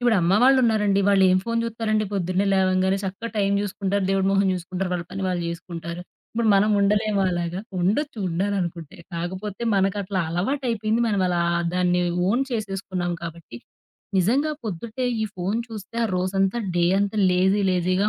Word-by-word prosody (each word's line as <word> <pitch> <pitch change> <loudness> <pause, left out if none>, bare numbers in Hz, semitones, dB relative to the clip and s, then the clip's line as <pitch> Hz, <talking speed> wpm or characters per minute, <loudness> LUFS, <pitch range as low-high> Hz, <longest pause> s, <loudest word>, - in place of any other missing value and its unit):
ఇప్పుడు 240 -3 +3
అమ్మ 175 +2 +3
వాళ్లున్నారండి. 220 -7 +4
వాళ్లు 195 -1 +5
ఏం 185 - +4
ఫోను 230 0 0
చూత్తారండి? 220 -2 -1
పొద్దున్నే 185 +1 0
లేవంగానే 190 0 +2
చక్కగా 195 +4 -4
టైం 200 -1 +2
చూసుకుంటారు, 200 -1 -1
దేవుడి 195 0 +1
మొహం 195 0 +3
చూసుకుంటారు, 180 +1 -4
వాళ్ల 175 -1 -2
పని 195 0 -5
వాళ్లు 180 -2 -1
చేసుకుంటారు. 170 0 -6 0.3
ఇప్పుడు 230 -1 0
మనం 205 +2 +4
ఉండలేమా? 205 0 +2
అలాగా. 175 +1 -2 0.2
ఉండొచ్చు, 220 +7 0
ఉండాలనుకుంటే. 175 -2 -2 0.2
కాకపోతే 185 +6 -5
మనకట్లా 195 0 0
అలవాటు 260 +12 -1
అయిపోయింది. 220 +1 0
మనం 205 -3 +1
అలా 175 -1 0 0.3
దాన్ని 180 0 +2 0.3
ఓన్ 240 +7 +2
చేసేసుకున్నాం 195 -5 -3
కాబట్టి. 165 -7 -8 0.6
నిజంగా 270 - +2
పొద్దుటే 225 +5 -4 0.2
ఈ - - +1
ఫోను 195 +6 -1
చూస్తే 215 0 -9
ఆ - - +2
రోజంతా, 195 +3 0 0.2
డే 175 - +3
అంతా 205 +1 -1
లేజీ 190 +3 +3
లేజీగా 185 +3 +1
195 Hz, 155 wpm, -24 LUFS, 180-215 Hz, 0.6 s, వాళ్లు